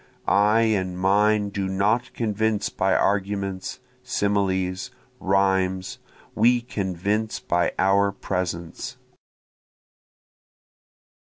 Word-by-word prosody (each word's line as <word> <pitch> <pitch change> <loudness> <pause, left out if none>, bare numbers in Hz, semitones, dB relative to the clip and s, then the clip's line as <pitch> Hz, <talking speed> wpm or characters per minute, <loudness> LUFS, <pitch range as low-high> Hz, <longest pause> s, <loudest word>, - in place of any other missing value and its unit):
(I 105 +3 +4
and 95 -5 0
mine 105 +2 +2
do 100 -2 -3
not 105 +7 0
convince 110 -1 0
by - - +1
arguments, 100 -1 -1 0.2
similes, 100 -3 -1 0.3
rhymes, 95 -1 +1 0.3
We 120 +2 +3
convince 105 0 -2
by 85 0 0
our 100 +1 +3
presence.) 90 -4 -4
100 Hz, 80 wpm, -24 LUFS, 95-105 Hz, 0.3 s, I